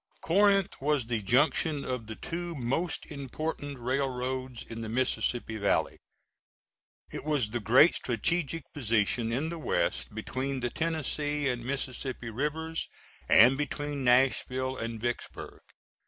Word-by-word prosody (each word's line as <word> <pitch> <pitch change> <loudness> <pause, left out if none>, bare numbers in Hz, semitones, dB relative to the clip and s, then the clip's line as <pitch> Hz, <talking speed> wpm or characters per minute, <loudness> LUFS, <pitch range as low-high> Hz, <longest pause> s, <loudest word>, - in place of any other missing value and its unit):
Corinth 195 +1 +4
was 145 -3 +1
the 115 -2 -1
junction 140 +6 +2
of 125 -4 -3
the 110 - -6
two 175 +4 -4
most 140 +7 -1
important 145 0 -4
railroads 130 0 -2
in 115 0 -7
the 110 - -5
Mississippi 120 -1 0
Valley. 100 -1 +1 1.1
It - - -5
was 140 -8 +1
the 120 - -1
great 125 +9 +6
strategic 160 +7 -1
position 115 -2 +1
in 140 +7 -1
the 170 0 -5
West 150 - -1
between 130 +4 -3
the 120 -1 -1
Tennessee 150 -2 -1
and 120 -2 -1
Mississippi 130 -2 -4
Rivers, 155 +6 -2 0.4
and 130 +5 +7
between 145 -1 -3
Nashville 130 +1 +2
and 115 -2 -4
Vicksburg. 120 +1 -4
130 Hz, 125 wpm, -29 LUFS, 120-150 Hz, 1.1 s, and